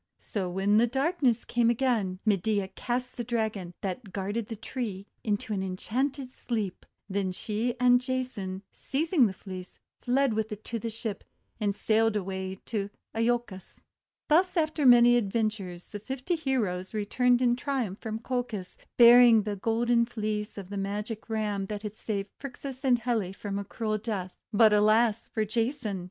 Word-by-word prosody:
So 190 -4 -3
when 195 +4 +3
darkness 270 -3 +1
came 240 -1 +2
again, 235 -6 +1
Medea 200 -1 +1
cast 245 +5 -3
the 240 - -2
Dragon, 215 -7 -2
that 195 +2 -4
guarded 205 +3 -3
the 225 - -5
tree, 215 -3 -5 0.2
into 210 0 -1
an 195 - -1
en 185 -1 -3
chanted 265 +4 -2
sleep. 215 -6 -4 0.2
Then 195 -1 -1
she 220 +5 -2
and 245 0 +5
Jason, 245 -7 -3
seizing 295 -2 +2
the - - -3
Fleece, 185 -1 -9 0.2
fled 260 0 +2
with 220 +1 -1
it 210 0 -6
to 230 - -4
the 230 - -3
ship, 225 -2 -5 0.4
and 205 -2 0
sailed 225 +1 +2
away 190 -1 -3
to 205 -3 -2 0.2
lolcos. 230 -4 -2 0.4
Thus 360 +4 +3
after 310 -3 +2
many 240 0 +8
adventures 205 -5 -2
the 205 - -6
fifty 265 - -3
heroes 220 - -1
returned 245 +4 +2
in 245 -1 +3
triumph 250 -7 -2
from 220 -1 -4
Colchis, 240 -7 -3 0.2
bearing 235 -2 +8
the 210 -1 -2
Golden 235 +3 +2
Fleece 215 -2 -3
of 195 -1 -8
the 200 - -3
Magic 210 +3 -4
Ram 210 -3 -1
that 210 0 -5
had 210 0 -5
saved 200 -3 -3
Phrixus 270 -1 -7
and 255 -2 +4
Helle 225 -6 -1
from 200 0 -4
a - - -3
cruel 215 +1 -2
death. 200 -5 -4 0.2
But, 215 0 +6
alas 215 +1 +3
for 220 - -1
Jason! 225 -1 -1
220 Hz, 160 wpm, -28 LUFS, 200-245 Hz, 0.4 s, many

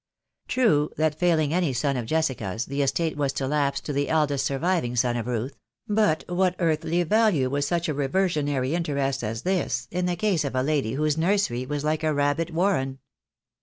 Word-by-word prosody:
True 205 - +2
that 155 -1 +2
failing 155 -2 +1
any 170 -6 +1
son 140 +3 0
of 120 -3 -3
Jessica's, 120 -9 -1
the 140 +1 -2
estate 150 +4 0
was 140 -2 0
to 135 - -2
lapse 140 -1 0
to 145 - -5
the 140 +1 0
eldest 150 -4 +1
surviving 140 -3 0
son 120 0 +1
of 120 0 -3
Ruth; 125 +3 -3 0.3
but 210 -7 +2
what 180 0 +1
earthly 165 +1 +1
value 185 - +2
was 145 0 0
such 170 +1 0
a 155 - 0
reversionary 145 -2 0
interest 140 -6 -1
as 110 +2 -4
this 175 -10 -1
in 180 +1 -1
the 175 - 0
case 180 -3 +1
of 140 -2 -3
a 130 - +1
lady 140 -6 0
whose 150 +2 0
nursery 170 -8 +1
was 145 0 -3
like 155 +1 0
a 155 -1 +1
rab 145 +1 +1
bit 165 +1 -2
warren? 160 -7 0
150 Hz, 195 wpm, -25 LUFS, 135-170 Hz, 0.3 s, True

